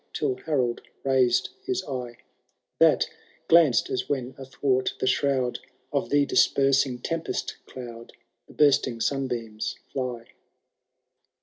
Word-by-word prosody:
Till 140 -4 0
Harold 125 -6 0 0.2
raised 130 -2 +3
his 380 -1 -2
eye, 125 -3 -5 0.6
TtaX - - +5 0.4
glanced 155 -8 +5
as 130 - -2
when 130 -2 -2
athwart 135 -1 -1
the - - 0
shroud 130 -2 +1 0.3
Of - - 0
the 145 0 +3
dispersing 135 -2 +3
tempest 165 +6 -3
cloud 115 -2 -9 0.4
The - - -15
bursting 135 -5 +3
sunbeams 120 -5 -2 0.2
fly. 125 -3 -4
130 Hz, 110 wpm, -26 LUFS, 120-140 Hz, 0.6 s, TtaX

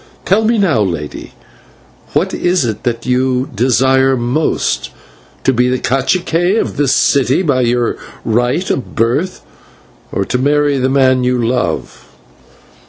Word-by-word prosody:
Tell 200 +4 +2
me 230 +1 +2
now, 180 - +2
lady, 85 -7 -4 0.8
what - - 0
is 175 -5 +1
it 110 -3 -3
that 120 -1 -2
you 130 +1 0
desire 130 +3 +2
most 120 - -1 0.5
to 130 - +2
be 125 +1 +2
/cacique/ 170 - 0
of - - -3
this 145 -3 +2
city 140 +6 +2
by 140 -6 +1
your 120 0 0 0.3
right 120 - 0
of 130 - -4
birth, 125 +11 -1 0.7
or 100 - -1
to 125 - -1
marry 145 +1 +2
the 130 +1 +1
man 130 -1 +3
you 125 0 +1
love?" 120 +1 -2
130 Hz, 135 wpm, -15 LUFS, 120-145 Hz, 0.8 s, man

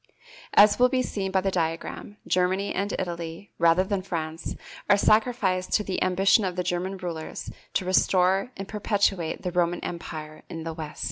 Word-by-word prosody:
As 205 +2 +7
will 250 0 +6
be 255 0 +1
seen 195 -5 -3
by 190 0 +1
the 195 0 0
diagram, 165 +4 -3
Germany 185 +2 +1
and 200 +2 -1
Italy, 170 +1 -5
rather 170 +2 +5
than 195 0 -1
France, 165 -3 -4 0.3
are 205 - +6
sacrificed 210 -4 +2
to 210 - +3
the 190 -2 -3
ambition 195 +4 +4
of 185 -2 -2
the 180 - -1
German 180 +2 -2
rulers 170 -4 -6 0.2
to 185 - +1
restore 185 +3 +3
and 195 0 -6
perpetuate 200 -5 0
the 180 - -2
Roman 175 0 +1
empire 155 -3 -6
in 165 -1 -6
the 165 0 -4
West. 155 -2 -7
185 Hz, 175 wpm, -26 LUFS, 170-200 Hz, 0.3 s, As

